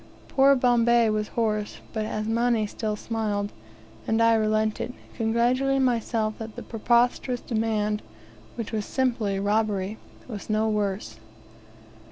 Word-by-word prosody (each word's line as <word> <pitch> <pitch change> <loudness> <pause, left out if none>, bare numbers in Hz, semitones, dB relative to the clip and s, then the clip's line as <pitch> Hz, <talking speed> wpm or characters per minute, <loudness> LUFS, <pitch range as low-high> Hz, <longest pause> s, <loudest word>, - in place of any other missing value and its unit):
Poor 275 +1 +5
Bombay 240 -2 +4
was 215 0 -1
hoarse, 215 -3 -1 0.2
but 215 -1 -2
Asmani 225 +1 +1
still 210 0 -3
smiled; 210 -2 -2 0.6
and 225 0 +2
I 230 0 +5
relented, 215 +2 +1 0.2
congratulating 250 +4 +2
myself 225 -3 0
that 220 -1 -7
the 245 - -7
preposterous 240 +2 +1
demand, 215 -2 -1 0.5
which 230 -3 -5
was 215 -2 -1
simply 230 -6 0
robbery, 205 0 0 0.3
was 215 -4 -7
no 215 +1 +2
worse. 205 -2 -2
220 Hz, 120 wpm, -26 LUFS, 215-235 Hz, 0.6 s, Poor